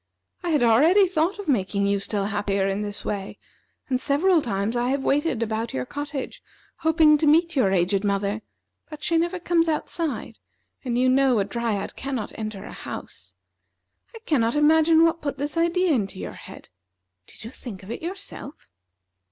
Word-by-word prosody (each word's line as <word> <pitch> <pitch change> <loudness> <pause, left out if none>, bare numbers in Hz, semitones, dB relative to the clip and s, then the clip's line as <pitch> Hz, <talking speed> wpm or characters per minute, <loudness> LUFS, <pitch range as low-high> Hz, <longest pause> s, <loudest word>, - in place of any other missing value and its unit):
I 350 - -3
had 300 -6 +2
already 310 - +5
thought 345 +2 0
of 405 - -8
making 200 -6 +1
you 200 0 +1
still 200 0 -2
happier 200 -1 0
in 195 +1 -1
this 205 -1 -4
way, 195 -2 -4 0.5
and 255 -1 -1
several 320 +4 +3
times 205 -1 -2
I 240 +1 0
have 270 0 -1
waited 280 -4 +1
about 220 - -3
your 125 -1 -2
cottage, 290 - -6 0.4
hoping 315 -2 +4
to 310 - +2
meet 335 +3 +4
your 215 -8 +3
aged 190 +2 +1
mother, 200 +1 -1 0.5
but 305 -1 -9
she 335 - +1
never 345 +2 -1
comes 335 -1 +1
outside, 315 0 -3 0.4
and 245 -3 -1
you 255 +1 +3
know 260 -1 +4
a 200 - +1
Dryad 220 -1 -3
cannot 265 -6 -4
enter 215 -2 -6
a - - -9
house. - - -9 0.8
I - - -8
cannot 235 -5 +1
imagine 320 +2 +5
what 330 0 +2
put 285 -2 -3
this 290 +3 -3
idea 340 +2 +2
into 200 -7 -1
your - - -6
head. - - -12 0.6
Did - - -14
you 225 - -8
think 210 -8 -9
of 195 - -8
it - - -5
yourself?" 350 -4 -7
265 Hz, 175 wpm, -24 LUFS, 210-320 Hz, 0.8 s, already